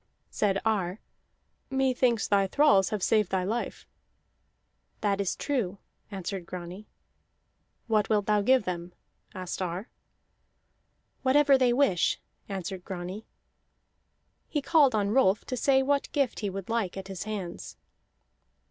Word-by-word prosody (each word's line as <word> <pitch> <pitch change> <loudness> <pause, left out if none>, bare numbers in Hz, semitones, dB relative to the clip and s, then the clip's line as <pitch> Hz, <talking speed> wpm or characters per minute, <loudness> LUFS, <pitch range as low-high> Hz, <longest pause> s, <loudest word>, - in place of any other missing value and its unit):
Said 195 -2 +1
Ar: 200 -3 0 0.7
"Methinks 255 -4 +1
thy 200 -1 +3
thralls 200 -5 +4
have 210 -3 -3
saved 215 -4 +3
thy 190 -1 0
life." 225 +6 -3 1.2
"That 200 -1 +1
is 195 - -1
true," 230 -10 -2 0.3
answered 195 -2 -5
Grani. 180 +4 -8 1.0
"What 215 -3 +1
wilt 210 -2 +2
thou 210 0 +3
give 255 +3 +4
them?" 175 -1 -5 0.4
asked 185 0 -5
Ar. 185 +4 -3 1.3
"Whatever 275 +1 +5
they 255 -2 +3
wish," 240 -9 +2 0.3
answered 190 -1 -5
Grani. 185 +4 -6 1.2
He 300 - 0
called 280 -3 +4
on 205 -1 +1
Rolf 215 -5 +3
to 255 - -3
say 265 +2 +3
what 280 +1 0
gift 275 -4 0
he 205 - -2
would 195 -1 -6
like 225 -5 -1
at 190 0 -6
his 195 0 -6
hands. 200 -5 -6
205 Hz, 130 wpm, -28 LUFS, 190-255 Hz, 1.3 s, Whatever